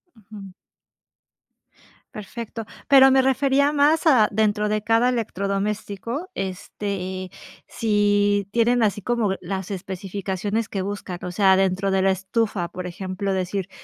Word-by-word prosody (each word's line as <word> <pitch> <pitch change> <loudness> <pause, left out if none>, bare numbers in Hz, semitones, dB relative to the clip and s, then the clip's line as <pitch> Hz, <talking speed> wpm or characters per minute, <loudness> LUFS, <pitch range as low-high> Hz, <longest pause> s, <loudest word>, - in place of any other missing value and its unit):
Ujú. 205 -2 -12 1.6
Perfecto. 225 0 -7 0.2
Pero 270 -1 +7
me 265 0 +5
refería 275 +2 +2
más 300 +3 +3
a 245 -8 +6
dentro 210 0 +1
de 215 0 0
cada 230 +3 +3
electrodoméstico, 210 - -3
este, 190 0 -4
eh, - - -12 0.4
si 205 -2 +1
tienen 235 +1 +2
así 205 -1 +1
como 230 -5 0
las 190 +1 -4
especificaciones 195 +2 -4
que 195 - -3
buscan, 195 -2 -5
o 180 - -4
sea, 190 0 +4
dentro 195 +1 +1
de 190 0 +2
la 195 - +3
estufa, 195 -1 -1
por 180 +1 -6
ejemplo, 190 +2 -4
decir: 190 +1 -2
205 Hz, 130 wpm, -23 LUFS, 190-230 Hz, 1.6 s, Pero